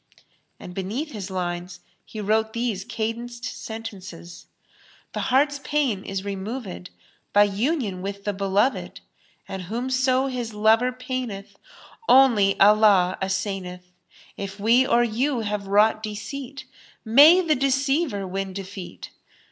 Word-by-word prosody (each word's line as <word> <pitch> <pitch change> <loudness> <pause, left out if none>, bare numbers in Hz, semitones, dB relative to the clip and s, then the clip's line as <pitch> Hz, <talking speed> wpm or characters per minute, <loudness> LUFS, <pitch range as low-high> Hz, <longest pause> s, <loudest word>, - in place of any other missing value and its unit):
And 180 - -9
beneath 215 - -4
his 205 -4 -6
lines 180 -1 -4 0.2
he 220 - -9
wrote 220 +2 0
these 230 -5 -2
cadenced 235 +2 -4
sentences, 190 -6 -8 0.7
"The - - -3
heart's 285 +2 +2
pain 270 -10 0
is 195 0 -4
removed 200 -1 -5 0.2
* - - -39
by 205 0 +7
union 205 - -1
with 200 +1 -5
the 205 - -1
beloved 200 +6 0 0.2
* - - -35
and 190 -1 -5
whomso 255 +6 0
his 245 -4 -4
lover 220 +4 +3
paineth 250 -5 -5 0.3
* 455 - -15
only 205 -7 +2
Allah 200 -3 +5
assaineth! 190 -2 -3 0.2
* - - -24
If 195 +1 -9
we 235 +5 +4
or 240 - +4
you 240 +3 0
have 205 -2 -3
wrought 210 +2 +3
deceit 260 +6 -6 0.2
* - - -31
may 320 +6 +9
the 330 -4 +2
deceiver 270 - 0
win 190 +1 -4
defeat! 190 - -8
215 Hz, 135 wpm, -24 LUFS, 195-255 Hz, 0.7 s, may